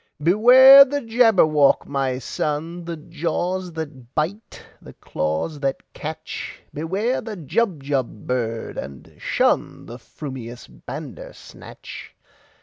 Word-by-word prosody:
"Beware 255 - +9
the 285 +1 -3
Jabberwock, 220 - +3
my 135 -2 -2
son! 155 +6 -4
The 170 -1 -5
jaws 175 +3 -3
that 140 -6 -8
bite, 180 +8 -3 0.2
the - - -13
claws 80 - -3
that 135 -1 -2
catch! - - -7
Beware 195 - -2
the 220 -3 -7
Jubjub 145 - -2
bird, 115 -3 -3
and 70 -2 -8 0.2
shunThe - - -1
frumious 125 -5 -9
Bandersnatch!" - - -10
155 Hz, 100 wpm, -22 LUFS, 135-200 Hz, 0.2 s, Beware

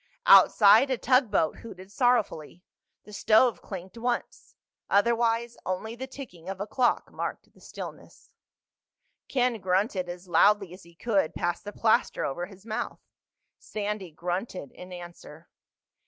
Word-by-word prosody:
Outside 215 +5 +7
a 260 - 0
tugboat 230 - +2
hooted 190 -4 -11
sorrowfully. 205 - 0 0.4
The 210 - -14
stove 220 +4 +3
clinked 190 +3 -9
once. 245 +1 -4 0.3
Otherwise 235 +2 +1
only 200 +5 -4
the 260 +2 -6
ticking 210 -11 -10
of 195 -1 -5
a 200 - -2
clock 245 +3 0
marked - - -6
the - - -22
stillness. - - -10 1.0
Ken 250 -3 0
grunted 185 0 0
as 175 +1 -8
loudly 195 +2 +3
as 185 - -12
he 170 -1 -18
could 195 -4 0
past 175 +3 -2
the 205 - -5
plaster 230 +3 +1
over 175 +6 -3
his 195 0 -16
mouth. 230 +2 -4 0.6
Sandy 210 -3 -4
grunted 175 - -5
in 180 0 -12
answer. 175 -2 -11
205 Hz, 135 wpm, -27 LUFS, 180-235 Hz, 1.0 s, Outside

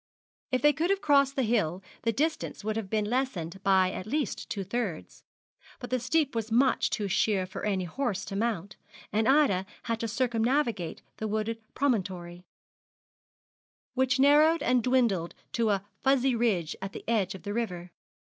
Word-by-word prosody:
If 255 +1 0
they 295 0 +6
could 325 +6 0
have 395 0 +2
crossed 280 -5 +3
the 265 - +1
hill, 195 -6 0 0.2
the 230 - +1
distance 310 0 -2
would 215 0 -1
have 220 -4 -3
been 215 0 0
lessened 205 -7 -2
by 190 -2 +3
at 185 - -6
least 295 +4 -2
two 200 - -3
thirds, 200 -4 -4 0.5
but 245 - -8
the 255 - +1
steep 285 +4 +1
was 225 -1 -3
much 255 +4 +3
too 210 -2 -2
sheer 200 -1 +1
for 185 - -8
any 195 -3 0
horse 205 +1 -2
to 195 - -6
mount, 210 -2 -2 0.4
and 220 +1 +2
Ida 270 -10 +4 0.2
had 230 -1 -2
to 230 - -2
circumnavigate 235 - 0
the 220 - -3
wooded 220 +2 -2 0.2
promontory, 185 -9 -1 1.5
which 260 0 +1
narrowed 300 +4 +5
and 250 0 +3
dwindled 230 -9 +1 0.2
to 230 -2 +1
a 200 -1 0 0.2
furzy 270 -1 +3
ridge 205 -9 0
at 195 0 -5
the - - -9
edge 205 -4 +1
of 190 - -11
the 205 - -4
river. 180 -6 -3
225 Hz, 170 wpm, -28 LUFS, 195-260 Hz, 1.5 s, they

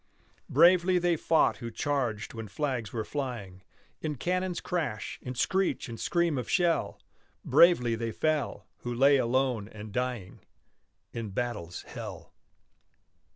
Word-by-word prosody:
Bravely 180 +1 +5
they 175 -1 +2
fought 160 0 +2
who 115 - -6
charged 120 -4 -2
when 115 -2 -6
flags 120 0 -2
were 110 -2 -3
flying 120 -10 -5 0.4
In 155 -2 -2
cannon's 180 +5 -1
crash, 150 -12 -3
in 125 0 -6
screech 190 +9 0
and 115 -1 -7
scream 170 -5 +1
of 125 - -5
shell; 170 -4 +1 0.5
Bravely 125 -10 +5
they 115 0 -2
fell, 155 +3 -1
who 120 - -5
lay 140 +3 +6
alone 125 -3 +1
and 110 -1 -9
dying 125 -5 -3 0.7
In 115 -2 -4
battle's 105 -6 -4
hell. - - -8
125 Hz, 130 wpm, -29 LUFS, 115-160 Hz, 0.7 s, lay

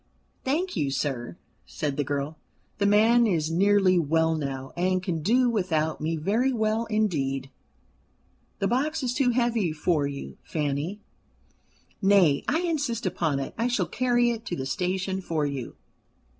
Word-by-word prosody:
"Thank 330 +8 -1
you, 150 -6 0
sir," 135 +1 -3 0.3
said 150 -3 -3
the 145 - 0
girl. 145 +2 -3 0.4
"The 200 - +3
man 225 +3 +5
is 165 -5 0
nearly 190 0 +4
well 160 +1 +2
now, 135 -3 -4
and 185 +1 0
can 170 -4 -2
do 245 +9 +3
without 165 -9 0
me 160 +2 -1
very 215 +12 +1
well 220 -1 0
indeed." 140 - -1 1.1
"The 195 - 0
box 290 +7 0
is 245 -1 0
too 255 -1 +2
heavy 235 -7 +1
for 155 -1 0
you, 140 - -7
Fanny. 150 +6 -3 1.0
Nay, 190 -8 +4
I 315 +4 +1
insist 290 - -1
upon 165 -6 0
it: 135 - -5
I 230 - +2
shall 245 - +1
carry 240 -1 +2
it 230 -1 -5
to 175 - -2
the 130 - -4
station 185 +6 -2
for 160 -4 -1
you." 140 -4 -4
185 Hz, 155 wpm, -26 LUFS, 150-230 Hz, 1.1 s, man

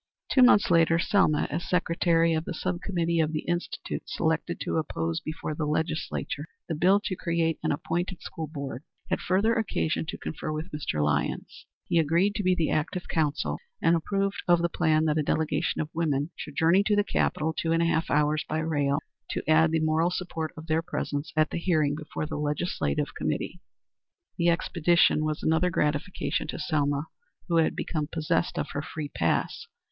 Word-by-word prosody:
Two 260 - +5
months 205 -7 +6
later 165 -1 +5
Selma, 175 -4 +3
as 165 +4 -3
secretary 170 -1 +2
of 160 0 0
the 180 - -4
sub 180 +1 -2
committee 170 -3 0
of 160 0 +1
the 155 - -1
Institute 175 0 -3
selected 160 +2 -1
to - - -1
oppose 85 - -1
before 155 0 -5
the 150 0 -2
legislature 155 -1 -2 0.2
the - - -2
bill 185 +6 +4
to 190 - -3
create 170 -2 0
an - - 0
appointed 175 +5 -2
school 160 -1 -5
board, 140 -4 -6 0.3
had - - +1
further 200 +5 +2
occasion 210 -9 0
to - - -4
confer 155 - -5
with 155 +3 -4
Mr. 135 - -2
Lyons. 75 0 -2 0.2
He 170 - +2
agreed 170 +6 +2
to 210 -1 -2
be 185 0 +3
the 165 -3 0
active 170 +4 -1
counsel, 155 -2 0 0.2
and 165 - +4
approved 195 +4 -1
of 175 -1 +4
the 170 - +2
plan 160 -2 +2
that 155 0 +2
a - - +3
delegation 155 +1 0
of 155 0 -6
women 155 -2 0
should 150 - -8
journey 170 +4 +4
to 210 - +3
the 205 - +3
capital, 160 -5 0
two 165 - -2
hours - - +3
and 165 - +2
a - - +2
half 165 0 +1 0.4
by 155 - -1
rail, 145 -3 +1 0.4
and - - -2
add 160 +1 +5
the 160 0 +1
moral 160 +2 +2
support 170 -3 -3
of 160 - -8
their 160 0 +1
presence 145 -2 -3
at 155 0 +2
the - - -2
hearing 155 -5 +2
before 155 0 -5
the 150 - -4
legislative 150 0 -1
committee. 180 - -3 0.8
The 170 0 +4
expedition 170 -2 +3
was 155 -1 -2
another 160 +3 +3
gratification 150 +3 -1
to - - -4
Selma 145 -3 0 0.4
who 170 -2 +2
had 160 - +3
become 155 -3 -2
possessed 155 -2 0
of - - -2
her 145 - -2
free 150 0 -6
pass. 85 - -1
160 Hz, 190 wpm, -27 LUFS, 155-175 Hz, 0.8 s, months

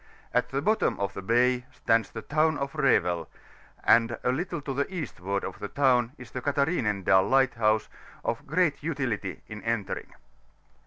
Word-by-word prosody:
At 125 0 +1
the 135 +1 -2
bottom 215 +1 +1
of 100 -1 -2
the 95 - -6
bay 125 +4 +2
stands 115 0 +1
the 110 - -7
Town 155 0 +2
of 140 0 -3
Revel, 90 - +2 0.5
and 115 0 +4
a 125 - +2
little 170 +7 -2
to 135 -1 -4
the 140 +6 -1
eastward 100 - -3
of - - -6
the 105 - -4
town 125 -1 +2
is 125 - -12
the 130 - -4
Cathaiinendal 115 - +2
Liffhthouse, 115 -5 +3 0.4
of - - -2
great 160 -2 +1
utility 130 - -3
in 105 -1 -8
entering. 115 -3 -3
125 Hz, 160 wpm, -27 LUFS, 110-140 Hz, 0.5 s, and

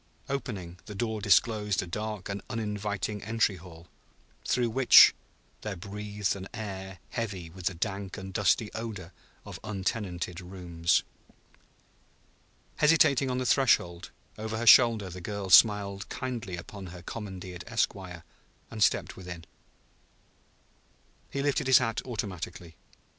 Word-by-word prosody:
Opening, 100 -11 -4
the 105 - -7
door 110 +1 -2
disclosed 105 -1 +2
a - - -6
dark 105 +2 -5
and 100 0 -4
uninviting 105 -2 -3
entry 110 -3 +1
hall, 85 -1 -13 0.6
through 120 -2 +1
which 130 +2 +8 0.5
there 105 -2 -4
breathed 105 +2 -3
an 95 0 -7
air 95 -4 -6
heavy 95 -8 -4
with 90 0 -4
the 90 - -1
dank 95 +1 -4
and 95 0 -8
dusty 105 +2 +1
odor 110 -6 -6 0.3
of - - -8
untenanted 95 -4 -3
rooms. 90 -2 0 1.7
Hesitating 145 -3 +4
on 125 - -1
the 130 - -1
threshold, 95 -10 +2 0.3
over 110 0 -3
her 120 - -2
shoulder 115 -3 +7
the 90 +1 -8
girl 100 +1 -5
smiled 100 -1 +5
kindly 120 -8 -4
upon 95 +2 -9
her 85 0 -10
commandeered 95 -4 -7
esquire; 95 -7 -2 0.5
and 110 -1 -6
stepped - - +2
within. 90 -3 -9 1.8
He 140 - -3
lifted 140 -2 0
his 130 - +8
hat 115 -3 0
automatically. 90 -7 -6
100 Hz, 125 wpm, -29 LUFS, 90-110 Hz, 1.8 s, which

